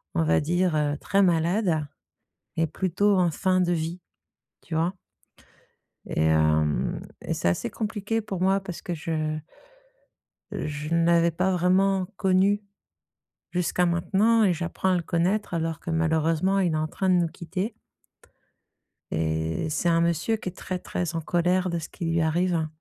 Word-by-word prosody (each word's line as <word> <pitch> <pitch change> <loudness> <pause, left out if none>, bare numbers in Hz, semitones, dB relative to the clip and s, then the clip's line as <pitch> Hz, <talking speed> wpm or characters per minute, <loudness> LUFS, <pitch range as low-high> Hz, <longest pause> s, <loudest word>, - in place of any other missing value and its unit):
on 80 - +2
va 80 +1 +3
dire, 155 -3 +1
très 200 0 +2
malade 170 -2 +1 0.7
et 165 - +2
plutôt 190 +4 +1
en 175 -2 +3
fin 185 +4 +1
de 175 -1 +2
vie, 165 +2 -3 0.6
tu 160 - -6
vois? 165 +3 +1 1.1
Et 80 0 +1
heu, 75 -3 +2 0.2
et - - -3
c'est - - -1
assez 85 - -1
compliqué 220 0 -2
pour 195 -4 -5
moi 190 +1 +3
parce 185 -3 -7
que 180 - -4
je 155 -1 -2 1.1
je 150 +1 -4
n'avais 170 0 +4
pas 185 +3 0
vraiment 185 +1 +2
connu, 195 +1 +3 0.9
jusqu'à 180 0 +1
maintenant, 200 +6 +3
et 190 - +4
j'apprends 175 +2 -1
à 185 - +3
le 175 - -1
connaître, 180 +6 0
alors 165 -1 -2
que, 170 - -5
malheureusement, 160 +3 +1
il 175 -3 +1
est - - +1
en 155 0 0
train 190 - -2
de 185 - +5
nous 175 -1 +3
quitter. 185 +6 -4 1.4
Et 80 - -1
c'est 155 +3 -1
un 165 0 +3
monsieur 170 +6 +1
qui 210 -4 -5
est - - -8
très, 185 -1 -4
très 175 -2 -3
en 165 - -1
colère 180 +3 +1
de 170 -1 -1
ce 160 - -7
qui 170 - -6
lui 165 0 +1
arrive 165 0 +1
170 Hz, 160 wpm, -26 LUFS, 160-185 Hz, 1.4 s, de